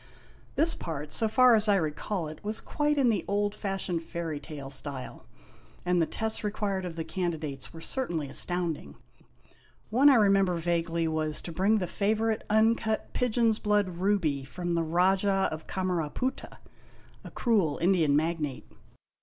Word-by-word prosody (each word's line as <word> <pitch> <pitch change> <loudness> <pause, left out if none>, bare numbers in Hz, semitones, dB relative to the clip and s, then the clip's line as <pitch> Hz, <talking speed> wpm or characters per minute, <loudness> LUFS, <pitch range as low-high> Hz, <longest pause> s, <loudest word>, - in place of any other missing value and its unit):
This 330 +1 +3
part, 150 -2 -6
so 225 - +1
far 250 +2 +6
as 215 0 +1
I 205 - +5
recall 165 +1 -2
it, 155 0 -10
was 215 +1 -3
quite 295 0 0
in 265 -4 +4
the 205 - -1
old 205 0 0
fashioned 195 -4 -3
fairy 165 -2 -4
tale 140 -2 -8
style; 135 -1 -7 0.6
and 180 -1 +2
the 160 - +2
tests 220 -1 -2
required 205 -2 -2
of 170 -2 -5
the 165 - -3
candidates 160 -7 -4
were 165 - -10
certainly 170 - -2
astounding. 175 +2 -3 1.0
One 265 +6 +6
I 275 - +7
remember 195 -4 +4
vaguely 170 0 0
was 155 -1 -1
to 170 - -6
bring 195 +6 +2
the 190 - -1
favorite 220 +4 0
uncut 220 0 +2
pigeon's 230 -2 +2
bloocl 205 -4 +1
ruby 180 -8 +1
from 175 +5 -4
the 170 - +1
Rajah 190 +4 +2
of 155 0 -7
Camaraputta, 185 - -2 0.7
a - - -8
cruel 205 - +1
Indian 170 -5 +3
magnate. 155 -3 -1
180 Hz, 155 wpm, -28 LUFS, 160-210 Hz, 1.0 s, I